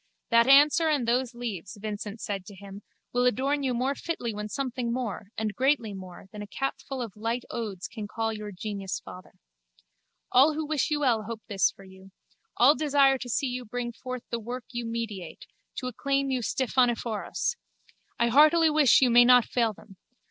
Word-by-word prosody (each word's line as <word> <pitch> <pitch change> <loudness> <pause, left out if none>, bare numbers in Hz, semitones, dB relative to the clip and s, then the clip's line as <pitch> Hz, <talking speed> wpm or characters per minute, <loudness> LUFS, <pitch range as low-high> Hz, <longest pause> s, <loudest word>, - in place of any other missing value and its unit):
That 235 +1 +5
answer 295 +4 +6
and 280 -6 0
those 245 +1 0
leaves, 210 -6 -6
Vincent 210 +1 -6
said 195 -2 -4
to 205 - -10
him, 200 +1 -11 0.3
will 245 0 +3
adorn 275 +5 0
you 260 -3 -1
more 260 +3 0
fitly 275 -7 -4
when 210 0 -5
something 250 -1 -3
more, 235 -5 -4
and 215 -1 -2
greatly 255 -5 +1
more, 185 -2 -10
than 210 -1 -8
a 205 - -7
capful 270 +2 -4
of 225 -5 -8
light 230 +3 -2
odes 205 -6 -4
can 215 -2 -7
call 225 +1 -2
your 210 -1 -6
genius 195 0 -5
father. 180 0 -12 1.0
All 280 +5 +5
who 315 0 -2
wish 300 -2 0
you 300 -1 0
well 230 -6 +2
hope 230 -1 -6
this 200 -4 +2
for 195 - -15
you. 190 0 -15 0.5
All 260 +4 +7
desire 280 -3 +3
to 245 - -7
see 275 +4 0
you 250 -1 -3
bring 240 +1 -4
forth 255 +1 -7
the 235 - -1
work 240 +3 -6
you 240 -2 -4
meditate, 215 -8 -5 0.3
to 255 - -5
acclaim 275 +2 -1
you 255 -1 0
Stephaneforos. 240 - 0 0.6
I 235 - +2
heartily 310 +5 +5
wish 295 -4 +5
you 250 - +4
may 240 +1 +8
not 245 -1 +6
fail 230 -3 +1
them. 195 -1 -16
240 Hz, 185 wpm, -27 LUFS, 210-265 Hz, 1.0 s, may